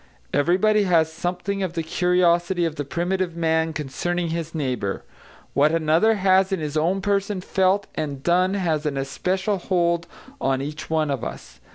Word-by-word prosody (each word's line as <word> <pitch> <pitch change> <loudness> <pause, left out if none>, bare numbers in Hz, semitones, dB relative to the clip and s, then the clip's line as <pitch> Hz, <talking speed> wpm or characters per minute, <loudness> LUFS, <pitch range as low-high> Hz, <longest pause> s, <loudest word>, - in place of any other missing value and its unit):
Everybody 200 +7 +3
has 160 -3 +2
something 180 +4 -3
of 185 -3 -2
the 165 -1 -2
curiosity 175 +1 +2
of 160 -2 -2
the 145 - -3
primitive 175 +3 -2
man 160 -1 +1
concerning 165 +4 -2
his 165 0 -4
neighbour; 125 -10 -2 0.5
what 145 +2 +4
another 165 +7 +3
has 190 -1 +3
in 190 - 0
his 150 -1 -4
own 175 +5 +1
person 200 -1 0
felt 190 +2 +1
and 140 -3 -4
done 185 +3 +2
has 160 -6 0
an 140 -2 -2
especial 185 +8 -1
hold 170 -2 0 0.3
on 135 -1 +1
each 150 +3 -6
one 155 -2 +1
of 135 -4 -3
us. 65 - -8
170 Hz, 165 wpm, -23 LUFS, 155-185 Hz, 0.5 s, what